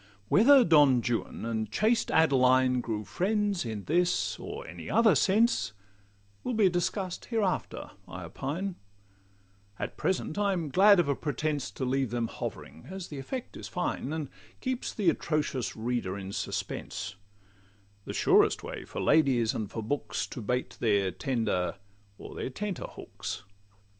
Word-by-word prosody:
Whether 265 +5 +7
Don 145 - +6
Juan 120 -1 -2
and 110 -1 -2
chaste 225 +3 +2
Adeline 130 -4 +4
Grew 110 -3 -3
friends 205 - 0
in 110 -3 -4
this 175 - +1
or - - -6
any 85 0 -8
other 220 -1 +5
sense, 200 - +3 0.7
Will 250 - -2
be 210 -4 +5
discuss'd 180 +1 -2
hereafter, 215 -6 -2 0.2
I - - -7
opine: 175 +8 -4 1.0
At - - -5
present 190 0 -1
I 200 -1 +2
am 165 -5 -2
glad 200 +4 +7
of 170 - +3
a 140 - +1
pretence 150 -1 -2
To 130 - -4
leave 130 0 0
them 120 0 -1
hovering, 80 - -7
as 190 -1 -6
the 145 - -6
effect 255 - -6
is - - -7
fine, 180 -5 -2
And 155 -3 -3 0.3
keeps 255 -1 -2
the 200 -5 +2
atrocious 145 -6 -2
reader 110 -4 -2
in 95 0 -6
suspense; 95 - -4 0.9
The - - -5
surest - - +4
way - - -6
for - - -6
ladies 130 -8 +3
and 105 -3 -3
for 115 - -5
books 145 +7 -2
To 125 - -6
bait 125 +4 -2
their 100 -4 +2
tender, 110 -6 -1 0.4
or - - -9
their - - -4
tenter, 195 +8 -4
hooks. - - -7
145 Hz, 150 wpm, -29 LUFS, 120-190 Hz, 1.0 s, Whether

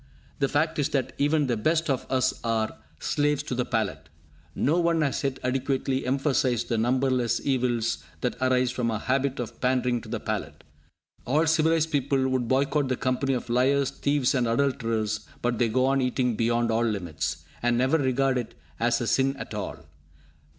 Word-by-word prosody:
The 140 - +2
fact 155 +3 0
is 145 0 +1
that 135 -4 -1
even 150 +1 +2
the 120 -3 0
best 155 +9 +1
of 135 -3 -1
us 130 -1 +2
are 115 -2 0 0.2
slaves 145 -1 0
to 140 - -4
the 125 0 0
palate. 80 -9 -2 0.5
No 155 +6 +2
one 170 -1 +2
has 145 -1 0
yet 135 -1 -1
adequately 130 +1 -1
emphasised 130 -3 +1
the 115 - +1
numberless 125 0 +1
evils 120 -4 0 0.2
that 125 - -1
arise 130 -1 +2
from 125 -2 -1
our 110 - -1
habit 135 +3 0
of 120 - -6
pandering 125 -2 +1
to 110 - -12
the 115 -1 -2
palate. 110 0 -4 0.6
All 150 +6 +3
civilised 160 0 +2
people 135 -1 +1
would 130 -2 0
boycott 140 +2 +1
the 130 -1 -1
company 130 +1 0
of 125 - -4
liars, 130 +3 +2
thieves, 140 -2 +1
and 125 -3 +1
adulterers; 115 -4 0 0.2
but 120 -1 0
they 120 -2 +3
go 130 +3 +2
on 135 0 +2
eating 125 -2 0
beyond 115 +1 +1
all 115 +1 +2
limits, 95 -9 -3 0.2
and 120 0 +2
never 130 +6 +2
regard 135 -1 +1
it 120 - -6 0.2
as 120 +1 +1
a - - -1
sin 135 +3 +2
at - - -7
all. - - -5
130 Hz, 180 wpm, -26 LUFS, 120-140 Hz, 0.6 s, All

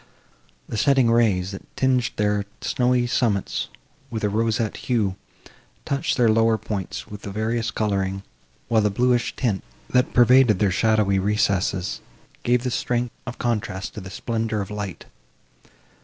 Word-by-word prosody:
The - - -4
setting 130 -1 +4
rays, 100 -6 +2
that 95 - -7 0.2
tinged 130 -2 +2
their 105 -1 +1 0.2
snowy 125 -1 +1
summits 115 -5 0 0.4
with 110 -2 -4
a 105 - +2
roseate 110 +1 0
hue, 110 -6 0 0.7
touched 140 +3 -1
their 120 -2 +4
lower 115 0 +4
points 100 -3 -5
with 105 0 -9
various 110 +3 -1
colouring, 95 -3 -1 0.4
while 110 -1 +3
the 105 - +2
bluish 120 +3 +1
tint, 110 -7 -1 0.3
that 125 +6 +3
pervaded 125 -3 +5
their 100 0 +2
shadowy 105 -1 +2
recesses, 100 -2 0 0.4
gave 120 0 +2
the 125 - -1
strength 120 0 -1
of 125 - -5
contrast 105 -5 -2
to 105 - -7
the 95 - -8
splendour 110 +1 -2
of 100 0 -4
light. 100 -5 -5
110 Hz, 140 wpm, -23 LUFS, 100-120 Hz, 0.7 s, pervaded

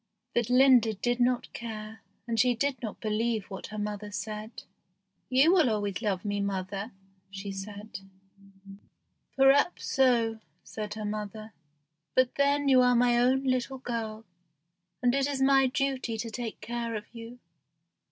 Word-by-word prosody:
But 240 -1 0
Linda 250 -3 +5
did 240 +5 -1
not 245 0 +1
care, 220 -1 -7 0.2
and 230 -2 -2
she 250 +2 +4
did 265 +1 -1
not 220 -4 -6
believe 220 -1 -1
what 190 - -6
her 215 - -8
mother 210 0 -4
said. 215 +2 -6 0.7
"You 275 +7 +5
will 330 -9 +4
always 205 -2 -2
love 200 -3 -1
me, 205 0 -1
Mother," 200 +2 -3 0.4
said 200 +2 -7
she. 195 0 -19 0.6
"Perhaps 275 +5 +4
so," 235 -4 +2 0.2
said 210 -1 -6
her 215 -1 -5
mother; 215 +1 -5 0.6
"but 255 -1 +3
then 285 0 +2
you 260 -2 +6
are 250 0 +4
my 240 0 +4
own 260 +2 +3
little 255 0 -1
girl, 225 -3 -5 0.8
and 245 0 +4
it 275 0 +1
is 280 -2 -2
my 270 0 +5
duty 260 -3 -1
to 230 +1 -4
take 230 -1 -6
care 235 +1 -4
of 210 -1 -5
you. 230 +1 -9
230 Hz, 150 wpm, -28 LUFS, 210-255 Hz, 0.8 s, you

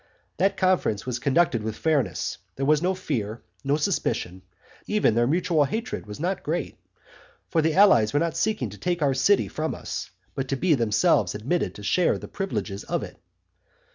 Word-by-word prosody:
That 195 0 +2
conference 185 - +1
was 125 -2 -3
conducted 140 -3 +2
with 110 0 -4
fairness; 155 -2 0 0.2
there 135 - -2
was 150 +1 +3
no 185 +2 +1
fear, 115 - -3 0.2
no 140 +1 +1
suspicion; 95 - -1 0.5
even 210 - +2
their 120 +1 +2
mutual 165 0 +2
hatred 220 - -4
was 105 - -8
not 180 +4 -1
great; 165 +4 -3 0.7
for 165 - +2
the 160 0 +1
allies 180 - +6
were 145 - +2
not 165 0 -1
seeking 165 - -1
to 105 - -11
take 175 -3 -1
our 140 -2 +3
city 195 +10 +3
from 155 +1 -3
us, - - -5 0.2
but 135 -1 -3
to 135 - -1
be 170 +4 +2
themselves 115 - +2
admitted 135 +12 -1
to 105 - -10
share 175 - +2
the - - -9
privileges 105 - -4
of - - -2
it. - - -10
150 Hz, 180 wpm, -25 LUFS, 115-180 Hz, 0.7 s, allies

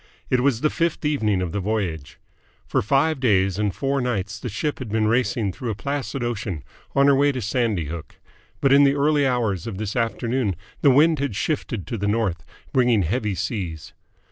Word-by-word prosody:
It 130 - +4
was 125 -2 +1
the 155 - +2
fifth 165 -2 -1
evening 110 -11 +1
of 85 - -3
the 100 - -2
voyage. 95 -8 -3 0.5
For - - 0
five 140 +7 +2
days 95 -6 +2
and 105 -1 +1
four 135 +6 -1
nights 105 -4 -2
the 125 - -5
ship 145 +8 -2
had 130 -4 -6
been 110 0 +1
racing 110 -3 +1
through 120 +5 -5
a 110 - -2
placid 140 +1 -3
ocean 105 - -3 0.3
on 140 0 +5
her 140 - +6
way 145 +1 +4
to 130 - -4
Sandy 110 - 0
Hook: 80 +2 -7 0.5
but 135 -1 +4
in 140 +1 +7
the 140 0 +4
early 145 0 +3
hours 115 -8 0
of 105 -5 -5
this 105 0 -4
afternoon 115 -2 0 0.3
the 145 - +6
wind 150 +3 +5
had 140 -7 -2
shifted 115 - -2
to 115 -4 -4
the 100 - -1
north, 105 -5 0 0.3
bringing 120 -5 +3
heavy 105 +3 -1
seas. 90 -6 -4
115 Hz, 195 wpm, -23 LUFS, 100-135 Hz, 0.5 s, in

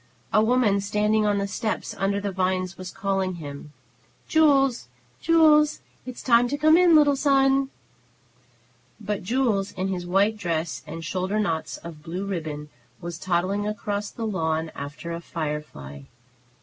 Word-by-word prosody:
A 215 - +5
woman, 220 -4 +2
standing 210 +1 +1
on 205 -1 +2
the 200 - 0
steps 215 +2 -3
under 200 +1 0
the 200 0 -3
vines, 185 -1 -1
was 185 0 -8
calling 190 -2 -2 0.9
"Jules, 275 - +3 0.3
Jules, 305 -2 +4 0.3
it 255 - -6
is - - -10
time 240 -1 +4
to 285 - -2
come 310 +2 +5
in, 350 -1 +6
little 290 -2 +5
son!" 270 -1 +3 1.3
But 210 -2 -3
Jules, 215 -2 0
in 190 0 -2
his 180 -2 -4
white 200 +4 +2
dress 170 -4 -2
and 165 0 -7
shoulder 185 +5 -1
knots 165 -7 -2
of 165 -3 -10
blue 175 +4 -5
ribbon, 155 -6 -5 0.3
was 170 -1 -7
toddling 190 +3 0
across 210 -1 -3
the 230 - -6
lawn 160 -5 -1
after 150 +4 -7
a 170 0 -5
firefly. 150 - -6
200 Hz, 150 wpm, -25 LUFS, 170-235 Hz, 1.3 s, in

